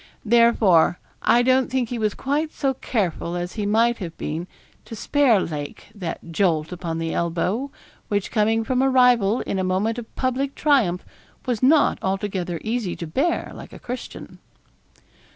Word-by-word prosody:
Therefore, 220 -7 +4 0.2
I 240 +1 +4
don't 260 0 +3
think 255 -2 -1
he 245 - -3
was 215 -1 0
quite 295 +4 -1
so 270 -2 -1
careful 185 -9 -2
as 175 0 -4
he 210 -2 -3
might 230 +3 +2
have 170 -4 -7
been 165 +4 -4 0.4
to 225 - -8
spare 255 -1 +3
Lake 150 -2 -6
that 170 -4 -6
jolt 165 -3 +1
upon 170 -2 -4
the 165 0 -3
elbow, 180 +10 -1 0.4
which 205 -2 -2
coming 225 0 +2
from 255 +3 0
a 270 - +3
rival 245 -4 +4
in 195 - -3
a - - 0
moment 200 +6 0
of 225 - -12
public 265 +2 -1
triumph 240 - +2 0.4
was 245 -4 -1
not 285 +3 +4
altogether 190 -3 -2
easy 220 -5 -2
to 170 - -6
bear 280 - -1
like - - -11
a - - -9
Christian. 250 +1 -8
220 Hz, 165 wpm, -23 LUFS, 180-250 Hz, 0.4 s, Therefore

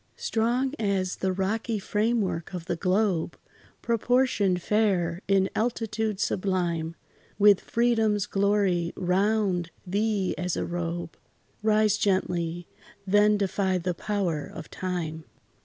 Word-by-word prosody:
Strong 245 +4 0
as 195 -4 0
the 190 - 0
rocky 215 +4 -1
frame 215 +3 0
work 180 -2 -3
of 170 -2 -6
the 175 - -1
globe, 185 -1 0 0.5
Proportioned 235 -5 +2
fair, 185 -4 +1
in 195 -1 +3
altitude 220 -3 -1
sublime, 175 -5 -1 0.4
With 205 -1 +6
freedom's 225 -4 +1
glory 195 -4 +1
round 190 -1 +1 0.2
thee 200 0 0
as 180 -1 -1
a - - -1
robe, 170 -1 -4 0.5
Rise 215 -1 +3
gently 175 -3 0 0.4
then 205 +2 +4
defy 190 -1 0
the 180 0 -2
power 180 -6 -2
of - - -10
time. 170 -4 -4
195 Hz, 115 wpm, -27 LUFS, 180-215 Hz, 0.5 s, With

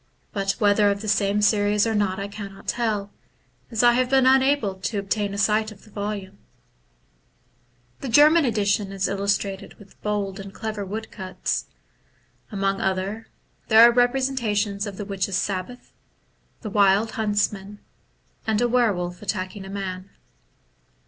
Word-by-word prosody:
but 195 -1 0
whether 205 0 +3
of 200 0 -1
the 215 - -6
same 205 0 +1
series 205 0 +3
or 225 - 0
not 200 -3 0
I 200 - -3
cannot 200 -1 -9
tell, 215 -4 -1 0.6
as 225 0 0
I 240 0 +6
have 250 +1 +1
been 265 -1 +4
unable 265 -5 +3
to 190 +3 -4
obtain 200 +1 -1
a 200 - -5
sight 215 +2 +1
of 205 - -15
the 215 - -18
volume. 200 -1 -5 1.6
The 270 - -5
German 300 +6 +6
edition 205 -4 0
is 195 0 -1
illustrated 200 0 -2
with 200 -2 -19
bold 205 -2 -2
and 195 0 -8
clever 215 -1 -5
woodcuts. 195 -1 -4 0.8
Among 195 -1 -1
other, 195 +4 -2 0.4
there 225 +2 +8
are - - +5
representations 240 -5 +1
of 200 -2 -7
the 205 - -5
Witches* 195 -1 -2
Sabbath, 195 +6 -4 0.7
the 215 - -6
Wild 200 +2 +3
Huntsman, 205 -2 -1 0.7
and 220 -1 +1
a 240 - +2
Were 240 -2 +3
wolf 175 -1 -5
attacking 195 -1 -4
a - - -9
Man. 190 -1 -5
205 Hz, 150 wpm, -24 LUFS, 195-220 Hz, 1.6 s, there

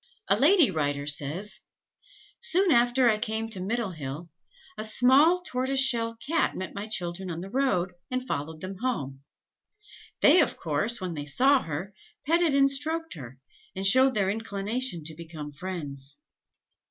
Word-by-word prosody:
A - - +5
lady 300 - +5
writer 145 -3 -1
says: 150 +7 -1 0.8
"Soon 370 +1 +2
after 245 0 +4
I 215 -2 +3
came 220 +1 -2
to 210 -4 -4
Middlehill, 175 - -4 0.5
a - - -5
small 270 +10 +4
tortoise 260 -3 -1
shell 230 -3 +2
Cat 280 +8 -1
met 185 - -5
my 200 +1 -5
children 185 -2 -3
on 170 0 -5
the 195 +2 -8
road, 205 -9 0 0.2
and 255 0 -3
followed 155 - -4
them 185 +1 -6
home. 140 - -3 1.0
They, 325 +5 +7
of 285 - -1
course, 170 +9 0
when 185 -2 -4
they 145 -2 -6
saw 265 - +4
her, 165 +6 -5 0.3
petted 330 -1 +2
and 275 0 +4
stroked 320 +4 -2
her, 130 -6 -10 0.4
and 190 +1 -3
showed 260 +6 +5
their 195 -2 +1
inclination 215 -1 -3
to 160 +1 -5
become 160 -2 -8
friends. 145 -5 -6
210 Hz, 155 wpm, -27 LUFS, 165-260 Hz, 1.0 s, They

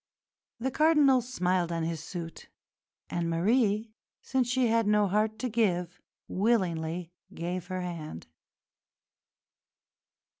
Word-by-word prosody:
The 260 +3 -1
Cardinal 295 -3 +5
smiled 180 -8 0
on 165 -1 -1
his 165 -1 -3
suit, 165 -2 -7 0.6
and 170 -1 -2
Marie, 215 +5 +2 0.3
since 260 -2 0
she 255 0 +2
had 230 -1 +2
no 210 -1 +4
heart 215 +3 +1
to 255 - -2
give, 190 -6 0 0.3
willingly 180 -5 0 0.2
gave 175 +1 -4
her 185 0 -3
hand. 165 - -6
190 Hz, 110 wpm, -29 LUFS, 170-230 Hz, 0.6 s, Cardinal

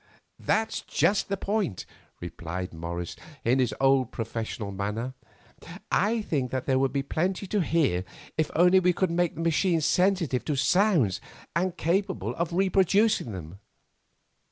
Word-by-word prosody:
"That's 220 0 0
just 195 +7 +1
the 200 - -1
point," 200 - -2 0.4
replied 85 +1 -5
Morris 85 +1 -5 0.3
in 125 +3 +3
his 125 -2 +2
old 135 -2 +3
professional 115 -2 -4
manner. 105 +6 -3 0.8
"I 220 +3 +2
think 135 -9 -1
there 130 +1 0
would 135 -1 +1
be 140 0 -1
plenty 180 +7 -1
to 205 +2 -1
hear 150 - +1 0.3
if 155 -1 0
only 180 +3 +5
I 180 0 +4
could 185 0 0
make 175 0 0
the 165 - -5
machine 165 +1 +2
sensitive 180 -4 +1
to 150 - 0
the - - -2
sounds 140 - +3 0.3
and 180 +1 0
capable 190 +4 0
of 170 0 -2
reproducing 195 - +2
them." 90 -1 -8
160 Hz, 145 wpm, -27 LUFS, 115-185 Hz, 0.8 s, only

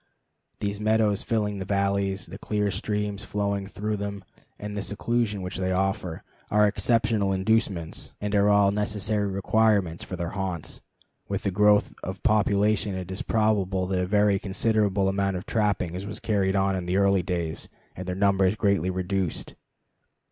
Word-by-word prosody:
The 100 0 -1
meadows 110 -1 +2
filling 105 -3 -1
these 95 - -5
valleys, 100 0 0
the - - -9
clear 105 -1 -1
streams 105 0 -2
flowing 100 -1 -2
through 105 +2 -3
them, 100 -1 -5 0.3
and 105 0 -6
the 100 - -2
seclusion 105 -1 -1
which 90 -2 -5
they 95 0 -1
offer, 95 -3 -1 0.3
are 105 0 +4
exceptional 110 -1 +1
inducements 95 -3 0
and 105 0 -3
are 100 0 +4
all 100 -1 +5
necessary 105 0 0
requirements 100 -3 +1
for 90 - -6
their 85 -1 -4
haunts. 95 -5 -4 0.5
With - - -3
the 100 - 0
growth 105 +2 +4
of 95 +1 -6
population 105 -2 +2
it 95 -1 -5
is 95 - -4
probable 100 -4 +1
that 95 -1 0
a 90 - -1
very 105 0 +3
considerable 100 -1 +1
amount 95 -1 0
of 90 - -7
trapping 100 -6 0
was 100 +3 -5
carried 100 -3 +1
on 95 0 +2
in 90 -1 -3
early 100 -1 +4
days, 85 -3 -3 0.3
and 95 +1 -7
their 90 - -2
numbers 95 0 +3
greatly 100 -4 +1
reduced. 95 -1 -2
100 Hz, 160 wpm, -26 LUFS, 95-105 Hz, 0.5 s, all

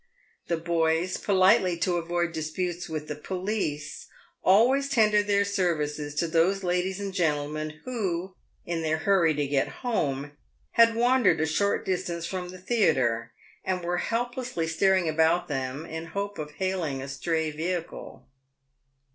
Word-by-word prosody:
The 170 - 0
boys, 165 +1 0
politely 185 -2 +3
to 175 +1 0
avoid 175 0 -1
disputes 175 +2 -3
with 155 -1 -4
the - - -3
police, 165 -3 -4 0.4
always 255 +9 +4
tendered 210 -5 +3
their 200 0 +3
services 150 -7 -1
to 165 +3 0
those 175 +4 +2
ladies 180 +2 0
and 200 -1 -4
gentlemen, 155 -3 -1
who, 190 -7 -2 0.3
in 170 -1 -2
their 160 0 0
hurry 165 -2 +3
to 145 0 0
get 140 -1 +1 0.2
home, 145 - -1 0.4
had 230 -1 +5
wandered 245 -7 +3
a 160 - +2
short 200 +6 0
distance 175 -2 -2
from 180 0 -4
the 185 - -9
theatre, 155 - +1 0.3
and 185 -2 -2
were 175 +1 -1
Helplessly 240 -5 -2
staring 185 +2 +2
about 160 +3 +2
them 135 +1 -3
in 160 0 -6
the - - -12
hope 200 +2 -4
of 150 -1 -6
hailing 180 -6 -2
a 135 - -6
stray 160 +3 -1
vehicle. 170 +3 -5
175 Hz, 145 wpm, -27 LUFS, 155-195 Hz, 0.4 s, had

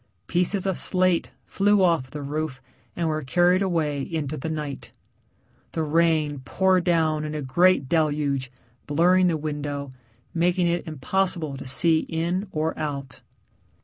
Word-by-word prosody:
Pieces 180 +3 0
of 190 -2 0
slate 185 -2 +2 0.2
flew 205 0 +2
off 165 -8 +2
the 150 +1 -7
roof 150 -1 -3 0.4
and 170 -1 -1
were 155 -1 -1
carried 175 +6 +3
away 160 -7 0
into 155 -1 -3
the 155 +2 -5
night. 150 -3 -5 0.8
The 160 - -1
rain 155 -2 +1
poured 185 +7 +2
down 160 -3 +2
in 155 0 -4
a 150 - -3
great 170 +2 +3
deluge, 145 -4 0 0.4
blurring 180 +5 +4
the 165 -2 +1
window, 145 -2 -4 0.4
making 175 +1 +1
it 170 0 -1
impossible 160 +1 -1
to 135 - -8
see 160 +5 +3
in 175 +5 -1
or 155 +1 -1
out. 140 -4 -5
160 Hz, 145 wpm, -24 LUFS, 145-175 Hz, 0.8 s, blurring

